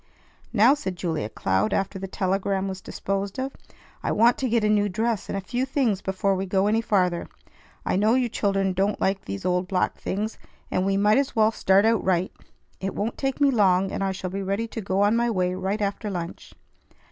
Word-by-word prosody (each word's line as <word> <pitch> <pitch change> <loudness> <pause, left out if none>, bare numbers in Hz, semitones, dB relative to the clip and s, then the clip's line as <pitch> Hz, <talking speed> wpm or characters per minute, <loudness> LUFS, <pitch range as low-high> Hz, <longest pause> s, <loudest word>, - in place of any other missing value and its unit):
"Now," 235 +4 +6
said 195 -11 -4
Julia 160 - -2
Cloud 95 0 0
after 195 0 -1
the 195 - -5
telegram 195 +1 -1
was 190 -1 -5
disposed 195 +1 -3
of, 265 +1 -3 0.5
"I - - -1
want 230 +3 +4
to 260 - 0
get 230 -1 +2
a - - +3
new 205 -1 +2
dress 220 +2 -1
and - - -2
a - - -3
few 245 +7 -2
things 260 -7 0
before 195 +1 0
we 190 +1 -2
go 190 +1 +2
any 220 +2 +2
farther. 180 -6 +1 0.6
I - - +1
know 215 +4 +3
you 255 -1 +2
children 195 -4 0
don't 195 +3 0
like 195 0 0
these 100 0 -5
old 180 0 +1
black 185 -1 0
things, 215 +3 -3 0.3
and 185 +1 +1
we 195 0 +2
might 210 +4 +4
as 275 - -2
well 220 -1 +4
start 195 -1 +3
out 225 -2 +3
right. 185 -1 +1 0.5
It 195 0 -4
won't 220 +3 -2
take 270 0 -1
me 285 -1 +4
long, 195 -5 +3
and - - -2
I 195 - 0
shall 185 -1 -5
be 195 +1 -3
ready 200 +4 -1
to 225 - -5
go 190 0 0
on 205 +2 +3
my 235 0 +2
way 180 -4 0
right 190 +3 -2
after 200 +2 -2
lunch." 175 -3 -6
195 Hz, 215 wpm, -25 LUFS, 190-220 Hz, 0.6 s, Now